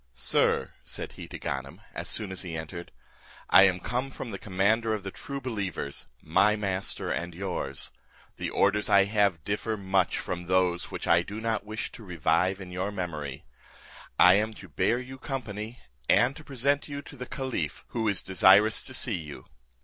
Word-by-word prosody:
"Sir," - - +1
said - - -5
he - - -9
to - - -7
Ganem, 65 +1 -4
as - - -4
soon 105 -4 -1
as 95 - -2
he 85 -3 -4
entered, 80 +2 -7 0.6
"I 95 - +9
am 90 -2 +2
come 125 +7 -2
from 130 -3 -7
the 100 - -5
commander 110 +3 +2
of 105 - -6
the 95 - -5
true 140 +7 -6
believers, 100 - -3 0.2
my 105 +1 +4
master 100 -2 -1
and 85 0 -3
yours; 85 -7 -2 0.5
the - - -2
orders 100 +1 +2
I 100 0 +7
have 100 -6 +2
differ 105 +3 -1
much 95 -2 +1
from 90 0 -4
those 90 -1 +1
which - - -5
I 85 0 +5
do 100 +5 -6
not 110 -2 -1
wish 110 +1 -4
to 115 - -11
revive 90 +1 +1
in 95 -2 -8
your 95 +3 -2
memory; 75 -9 -5 0.7
I 90 - +8
am 110 +2 +1
to 95 - -11
bear 115 +9 +2
you 130 +1 -7
company, 115 -4 -5 0.3
and 130 +3 +5
to 160 - -10
present 140 +1 +1
you 145 -1 -5
to - - -11
the 125 -2 -7
caliph, 130 - -3
who 115 -2 -1
is 100 -3 +1
desirous 95 +3 +5
to 130 - -5
see 120 - +2
you." 75 -3 -9
100 Hz, 185 wpm, -28 LUFS, 90-115 Hz, 0.7 s, I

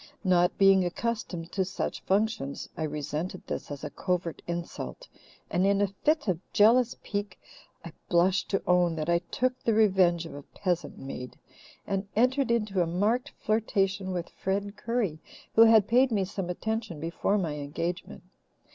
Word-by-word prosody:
Not 180 -2 +3
being 195 -1 +6
accustomed 180 -3 -3
to 190 - +1
such 185 - -4
functions, 200 -8 -1
I 160 - -2
resented 150 +4 -4
this - - -5
as 145 -1 -7
a - - -5
covert 180 -3 -2
insult 175 - -5 0.4
and, 180 - +2
in 200 0 +3
a 205 - +4
fit 295 +9 0
of 180 -4 +1
jealous 235 +4 +5
pique, 205 -2 -4 0.5
I 170 - -8 0.2
blush 180 +3 +3
to 195 - -1
own 180 -2 +3
that 155 +1 -3
I 170 - +4
took 250 +9 -2
the 225 - +1
revenge 185 -6 +4
of 160 - -8
a 145 - -7
peasant 175 +3 -3
maid 125 -2 -7 0.5
and 195 0 -2
entered 255 +3 +2
into 210 -5 +1
a 170 - +1
marked 215 - 0
flirtation 195 -3 0
with 175 -2 -3
Fred 200 +2 -3
Currie, 230 -10 -1 0.3
who 225 - +6
had 220 -3 +6
paid 250 +2 +4
me 200 -4 +1
some 190 -1 -5
attention 220 -2 -3
before 170 +6 0
my 170 -6 -1
engagement. 165 +5 -4
190 Hz, 165 wpm, -28 LUFS, 170-215 Hz, 0.5 s, being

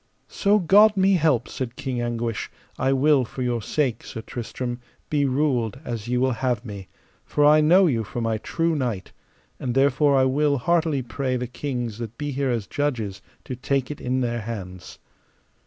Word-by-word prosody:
So 205 +1 +2
God 205 +3 +5
me 190 +1 +4
help, 150 -9 +2
said 125 -2 -5
King 130 -3 -3
Anguish, 120 -1 -2 0.3
I 135 - +2
will 135 0 +4
for 125 +2 -5
your 120 -2 -1
sake; 125 0 -1
Sir 115 - -7
Tristram, 120 +1 -5 0.3
be 145 -2 +2
ruled 130 -4 0
as 115 -2 -5
ye 125 +1 0
will 130 +1 +2
have 120 -1 -1
me, 100 -4 -8 0.4
for 145 - +1
I 150 +1 +6
know 180 +5 +6
you 120 -9 +1
for 110 - -6
my 115 -1 -1
true 165 +7 -1
knight; 120 -9 -3 0.5
and 125 -2 -3
therefore 140 +1 +3
I 130 - +4
will 140 +2 +2
heartily 160 -1 +1
pray 130 +1 -2
the 125 - -3
kings 120 -3 -4
that 115 -1 -6
be 145 -1 -3
here 135 0 -1
as 115 -4 -1
judges 115 -9 -2 0.2
to 130 - -5
take 135 +1 -1
it 150 - -8
in 130 +1 0
their 120 -1 -1
hands. 95 -5 -7
130 Hz, 185 wpm, -24 LUFS, 115-145 Hz, 0.5 s, I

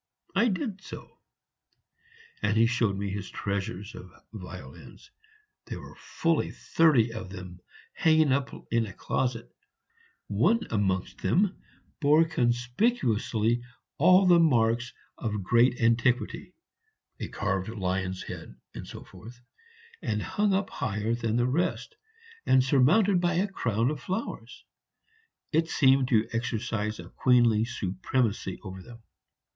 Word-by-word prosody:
I 240 - +3
did 200 -2 -3
so; - - -11 1.2
and 110 - +1
he 115 - +5
showed 115 -4 +1
me 100 0 -3
his 100 -1 -5
treasures 100 +1 -4
of 90 - -10 0.2
violins. 95 -4 -11 0.6
There - - -6
were - - -11
fully 165 -1 -1
thirty 130 -9 +2
of 110 -4 -7
them 90 -1 -9 0.3
hanging 155 -3 +3
up 140 +1 +1 0.2
in 115 -1 +1
a 100 - -9
closet; 120 +3 -2 0.7
one 230 +1 +2
amongst 95 -4 -1
them 195 +1 +1 0.4
bore 150 +2 +5
conspicuously 120 - 0 0.4
all 185 +5 +6
the 175 -2 +6
marks 120 -6 +2 0.3
of 105 -3 -3
great 120 +5 +3
antiquity 115 0 +1 0.6
(a - - -4
carved 95 +1 -2
lion's 95 -3 -2
head, - - -9 0.2
etc.), - - -9 1.0
and, 105 -2 -2
hung 205 0 0
up 195 +1 0
higher 105 +2 -2
than 115 -2 -1
the 120 0 +2
rest, 145 +8 -1 0.5
and 130 -1 +5
surmounted 175 - +4
by 175 -1 +1
a 190 +4 +1
crown 120 - 0
of 150 - -6
flowers, 190 +5 -5 0.9
it 165 0 +1
seemed 135 -3 +4
to 115 -3 +2
exercise 110 -2 -2
a 85 +1 -9
queenly 120 -3 +3
supremacy 100 0 -2
over 95 -2 -8
them. 115 +3 -14
120 Hz, 125 wpm, -28 LUFS, 105-155 Hz, 1.2 s, all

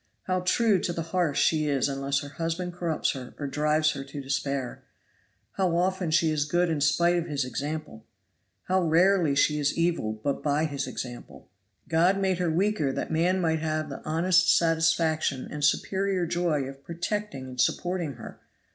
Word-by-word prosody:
How 185 0 0
true 195 +2 +2
to 175 - -2
the 165 -1 -3
hearth 175 -6 +1
she 155 -2 +2
is 140 -2 +1
unless 140 0 -1
her 145 - -8
husband 165 +3 -3
corrupts 170 -3 -1
her 130 -2 -8
or 145 - -4
drives 150 +2 +1
her 135 -2 -5
to 145 +1 -8
despair! 135 -1 -3 0.7
How 185 -3 +1
often 185 -1 0
she 160 0 +3
is 150 -2 0
good 175 +2 +1
in 150 -3 -1
spite 170 +4 +3
of 170 0 -2
his 145 -4 -1
example! 140 -2 -5 0.6
How 185 0 +1
rarely 170 -2 +3
she 150 +1 +2
is 145 0 0
evil 165 -10 0
but 110 +6 -3
by 150 +1 +1
his 145 -3 -3
example! 120 -6 -8 0.4
God 170 +4 +3
made 190 -2 0
her 175 -2 +1
weaker 175 -3 +1
that - - -4
man 175 +4 +2
might 160 -2 +1
have 155 -1 -2
the 135 - -8
honest 175 +3 +3
satisfaction 165 -4 +1
and 150 -1 -5
superior 195 +1 +1
joy 170 -4 0
of 135 +1 -9
protecting 170 -3 -4
and 125 -1 -2
supporting 175 +1 -1
her. 120 - -11
160 Hz, 175 wpm, -27 LUFS, 145-175 Hz, 0.7 s, she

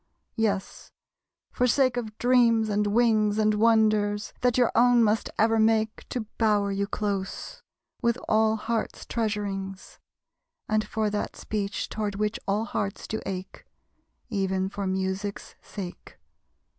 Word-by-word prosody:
Yes, 205 -3 -2 0.6
for 250 - +1
sake 255 0 +3
of 220 -3 -4
dreams 235 -3 +4
and 205 0 +1
wings, 215 -1 +3
And 215 0 +3
wonders, 215 -1 +2
that 245 -1 +2
your 245 -2 +3
own 245 0 +5
must 215 0 +1
ever 225 +1 +3
make 220 0 +1
To 250 - -2 0.2
bower 210 -3 +2
you 200 +1 -1
close, 200 - -3 0.4
with 235 0 +2
all 220 0 +3
hearts' 225 0 -3
treasurings; 200 -4 -3 0.7
And 215 0 +1
for 215 -1 -1
that 205 - -3
speech 200 -2 -3
toward 210 -2 -3
which 210 +1 -1
all 205 +3 +1
hearts 200 -3 -3
do 220 - -4
ache; 190 -1 -6 0.6
Even 190 -3 -1
for 200 0 -4
Music's 190 +2 -3
sake. 185 -4 -9
215 Hz, 130 wpm, -26 LUFS, 200-225 Hz, 0.7 s, own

